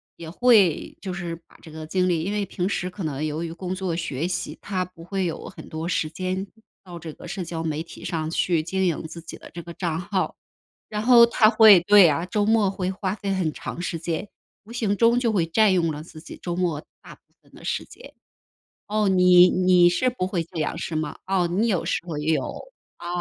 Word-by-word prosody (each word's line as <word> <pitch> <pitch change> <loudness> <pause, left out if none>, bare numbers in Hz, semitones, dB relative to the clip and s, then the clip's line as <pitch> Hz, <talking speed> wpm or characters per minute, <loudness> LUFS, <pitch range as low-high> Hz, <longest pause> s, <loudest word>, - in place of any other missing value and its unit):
也 165 -1 -9
会 205 -5 +3
就 185 -2 -5
是 175 -3 -4
把 165 - -21
这 165 - -13
个 155 0 -8
精 185 +3 0
力 165 -3 0
因 195 - -2
为 205 -1 -1
平 185 -1 -3
时 180 -2 -2
可 185 0 -8
能 150 -1 -3
由 155 +2 -3
于 165 - -5
工 180 +2 -5
作 185 -2 -3
学 160 -3 -3
习， 175 -1 -4
他 185 -2 -2
不 175 -2 -15
会 190 +1 -2
有 165 - -5
很 - - -12
多 160 +1 -5
时 155 -3 0
间 185 +4 -3 0.4
到 175 -1 -9
这 160 -1 -8
个 - - -12
社 195 - -4
交 165 -1 -5
媒 160 0 -2
体 - - -12
上 160 -2 -2
去 170 -1 +1
经 190 +3 -1
营 170 -3 -1
自 165 +1 -9
己 165 - -10
的 - - -14
这 170 - -6
个 170 0 -10
账 165 -2 -2
号。 190 0 -2 0.5
然 210 -1 -3
后 235 0 +7
他 225 -2 +4
会 220 -5 +8
对 200 -1 +7
啊， 155 +4 -1
周 205 +3 0
末 215 -2 +3
会 185 -1 -2
花 190 0 -3
费 200 -2 -4
很 170 -5 -1
长 175 - -6
时 175 -1 -3
间。 170 +4 -3 0.4
无 225 - -13
形 220 -4 0
中 235 +3 +4
就 235 -2 +1
会 195 -6 +2
占 210 +4 +3
用 170 -3 +1
了 150 0 -6
自 160 -1 -13
己 - - -10
周 175 -1 -4
末 175 -4 -1 0.2
大 - - -13
部 - - -36 0.2
分 - - -26
的 - - -14
时 - - -2
间。 - - -14 0.7
哦， 215 0 0
你 180 -1 +7
你 180 -1 +4
是 215 +9 +1
不 245 -7 -2
会 185 -3 -1
这 165 - -9
样 155 - -2
是 165 -1 -4
吗？ 155 -1 -3
哦， 190 -2 +1
你 195 +7 +1
有 185 -6 0
时 - - 0
候 165 -4 -5
也 150 +2 0
有， 145 - +1 0.5
啊。 - - -10
180 Hz, 255 characters per minute, -24 LUFS, 165-195 Hz, 0.7 s, 会